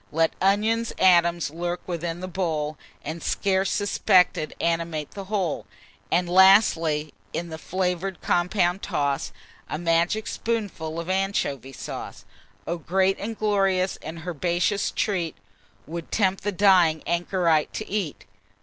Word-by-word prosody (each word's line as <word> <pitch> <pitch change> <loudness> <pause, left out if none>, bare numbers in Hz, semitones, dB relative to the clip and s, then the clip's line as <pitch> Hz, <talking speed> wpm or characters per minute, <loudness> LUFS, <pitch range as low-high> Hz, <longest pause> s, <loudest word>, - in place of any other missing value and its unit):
Let 160 +1 +2
onion's 215 +4 +2
atoms 170 -4 +4
lurk 175 +2 -3
within 170 -1 -3
the 185 - -4
bowl, 160 -5 -2 0.3
And, 160 +3 -5
scarce 195 -1 +1
suspected, 190 -5 +2
animate 165 -3 -1
the 195 -1 -7
whole; 185 - -2 0.4
And, 175 +1 +2
lastly, 175 -5 +4 0.2
in 170 0 -3
the 160 0 -7
flavour'd 185 0 -2
compound 180 +1 +1
toss 140 -1 -1 0.4
A - - -2
magic 170 +6 +1
spoonful 200 -8 -3
of 170 - -5
anchovy 185 - -1
sauce. - - -7 0.4
Oh! 170 - -2
great 190 +4 +1
and 220 +2 -5
glorious, 195 -3 +1
and 160 +1 -7
herbaceous 175 +4 0
treat, 180 -7 -1 0.5
'Twould 165 +1 -7
tempt 195 -3 +1
the 205 - 0
dying 180 -5 +4
anchorite 170 -2 +1
to 215 - -5
eat. 195 -7 -3
175 Hz, 130 wpm, -25 LUFS, 165-195 Hz, 0.5 s, atoms